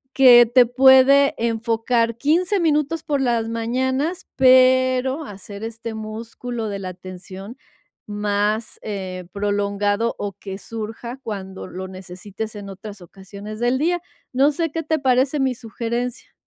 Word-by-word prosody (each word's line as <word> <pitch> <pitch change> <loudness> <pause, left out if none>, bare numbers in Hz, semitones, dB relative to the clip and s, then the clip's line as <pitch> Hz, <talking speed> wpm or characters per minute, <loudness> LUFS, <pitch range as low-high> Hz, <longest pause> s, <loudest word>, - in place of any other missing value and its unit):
que 245 -3 +8
te 245 +2 +5
puede 265 +2 +6
enfocar 230 0 0
15 340 - +1
minutos 310 -1 +1
por 285 -2 -1
las 235 -3 0
mañanas, 260 +8 -2
pero 260 +2 +4
hacer 200 -1 -10
este 225 0 -6
músculo 225 +1 -6
de 200 - -4
la 185 -1 -5
atención 185 +4 -10 0.5
más, 210 +1 -1
eh, 185 -3 -5
prolongado 205 +2 0
o 205 -1 -4
que 195 0 -8
surja 225 +4 -7
cuando 190 -3 -6
lo 185 +1 -7
necesites 190 +3 -8
en 200 -1 -8
otras 200 +1 -10
ocasiones 200 +4 -10
del 245 +2 +1
día. 350 +3 0 0.3
No 275 +3 +4
sé 330 +3 -2
qué 325 +1 -3
te 315 +1 0
parece 265 +2 +2
mi 265 -2 +1
sugerencia. 235 +2 -4
230 Hz, 135 wpm, -21 LUFS, 205-260 Hz, 0.5 s, que